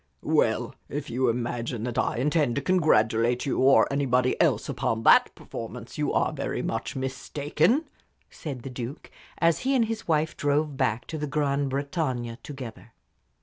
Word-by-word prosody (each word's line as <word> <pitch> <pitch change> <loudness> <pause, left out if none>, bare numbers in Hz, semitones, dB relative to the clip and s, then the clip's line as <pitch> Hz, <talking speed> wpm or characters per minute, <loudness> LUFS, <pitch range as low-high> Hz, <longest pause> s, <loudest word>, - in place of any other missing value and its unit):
"Well, - - +1 0.2
if 145 0 -5
you 125 +1 +1
imagine 120 -1 -2
that 120 -1 -2
I - - 0
intend 145 -1 +1
to 140 - 0
congratulate 120 -9 +2
you 140 - -1
or 135 +1 +6
anybody 130 -2 +2
else - - +2
upon 115 0 -1
that - - +6
performance 115 +1 -8
you 150 - +1
are - - +1
very - - -3
much 115 +4 -3
mistaken," 145 - 0 0.4
said 135 -6 -7
the 135 - -6
Duke, 125 +4 -7 0.3
as 170 -1 +3
he 270 +1 +1
and 240 -3 +4
his 225 0 -5
wife 155 -1 +1
drove 145 0 0
back 125 -2 0
to 160 - -5
the 150 - -2
"Grand 140 -1 0
Bretagne" 135 -4 -2
together. 130 -6 -9
135 Hz, 160 wpm, -26 LUFS, 120-150 Hz, 0.4 s, or